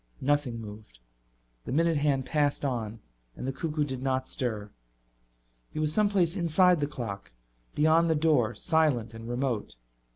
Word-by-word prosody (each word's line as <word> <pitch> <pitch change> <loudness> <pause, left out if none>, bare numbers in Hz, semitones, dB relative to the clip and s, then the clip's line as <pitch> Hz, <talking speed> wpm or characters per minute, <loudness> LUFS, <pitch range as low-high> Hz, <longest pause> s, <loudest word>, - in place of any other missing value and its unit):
Nothing 135 -4 0
moved. 105 - -10 0.7
The - - -5
minute 165 +3 +2
hand 140 -3 +1
passed 145 -1 +1
on 115 -4 -3 0.3
and - - -6
the 135 - -1
cuckoo 150 +2 -1
did 130 -3 -4
not 130 -1 -1
stir. 110 -5 -3 1.0
He - - -9
was 155 0 +1
someplace 200 -4 +2
inside 180 0 +4
the 145 - 0
clock, 105 - -6 0.4
beyond 160 +2 +4
the 160 - +3
door, 145 -8 +2
silent 135 -5 +1
and 115 +1 -8
remote. 120 - -2
140 Hz, 150 wpm, -28 LUFS, 120-160 Hz, 1.0 s, inside